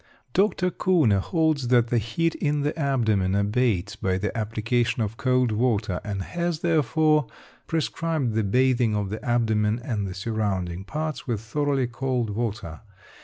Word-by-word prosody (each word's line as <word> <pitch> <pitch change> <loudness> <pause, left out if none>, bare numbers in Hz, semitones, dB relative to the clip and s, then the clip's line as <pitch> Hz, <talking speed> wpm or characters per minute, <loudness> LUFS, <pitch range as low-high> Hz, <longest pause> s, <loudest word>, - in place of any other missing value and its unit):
Dr. 190 -2 +2
Kuhne 155 - +3
holds 155 - 0
that 120 -1 +3
the 120 - +2
heat 160 +10 -1
in 150 0 0
the 145 +1 -1
abdomen 110 - +1
abates 105 -2 +1
by 95 -1 -1
the 100 +1 -3
application 115 +2 0
of 105 +1 -4
cold 125 -1 +1
water, 105 -4 0
and 100 -2 -3
has, 170 - -2
therefore, 155 -3 +2 0.4
prescribed 160 -5 -1
the 110 - +1
bathing 125 +1 +2
of 100 -2 -2
the 110 - -5
abdomen 110 -2 +1
and 105 -6 -2
the 90 - -6
surrounding 95 -4 -2
parts 155 +4 -4
with 115 -4 -1
thoroughly 135 +4 0
cold 120 -2 -2
water. 105 -6 -4
120 Hz, 150 wpm, -25 LUFS, 105-145 Hz, 0.4 s, Kuhne